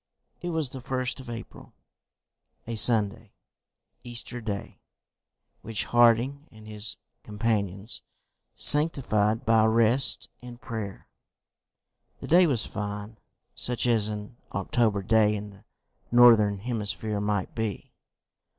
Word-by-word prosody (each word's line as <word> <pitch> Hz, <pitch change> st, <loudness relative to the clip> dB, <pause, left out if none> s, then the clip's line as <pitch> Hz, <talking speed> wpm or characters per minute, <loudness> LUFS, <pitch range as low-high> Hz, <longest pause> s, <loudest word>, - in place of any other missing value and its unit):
It 175 Hz, -, -4 dB
was 160 Hz, -6 st, -2 dB
the 130 Hz, -, -8 dB
1st 130 Hz, 0 st, -3 dB
of 130 Hz, -2 st, -10 dB
April, 115 Hz, -1 st, -10 dB, 0.9 s
a 115 Hz, -, -5 dB
Sunday, 110 Hz, -1 st, +3 dB, 0.7 s
Easter 120 Hz, 0 st, -5 dB
Day, 105 Hz, -3 st, -6 dB, 0.8 s
which 110 Hz, -1 st, -2 dB
Harding 120 Hz, +5 st, +2 dB
and 110 Hz, -1 st, -15 dB
his 105 Hz, 0 st, 0 dB, 0.2 s
companions 105 Hz, -1 st, -2 dB, 0.5 s
sanctified 130 Hz, -7 st, +3 dB
by 115 Hz, -1 st, +4 dB
rest 115 Hz, +4 st, +3 dB
and 120 Hz, -1 st, -11 dB
prayer. 110 Hz, -5 st, -7 dB, 1.1 s
The -, -, -8 dB
day 175 Hz, +2 st, +5 dB
was 125 Hz, -8 st, -1 dB
fine, 105 Hz, +1 st, -6 dB, 0.3 s
such 125 Hz, 0 st, -2 dB
as 115 Hz, -4 st, +2 dB
an 105 Hz, +2 st, -7 dB, 0.2 s
October 110 Hz, -5 st, 0 dB
day 105 Hz, +1 st, +3 dB
in 105 Hz, 0 st, -7 dB
the 100 Hz, 0 st, -19 dB, 0.5 s
northern 115 Hz, -4 st, +6 dB
hemisphere 105 Hz, -1 st, -4 dB
might 105 Hz, -2 st, -2 dB
be. 110 Hz, -4 st, -5 dB
110 Hz, 115 wpm, -26 LUFS, 105-120 Hz, 1.1 s, northern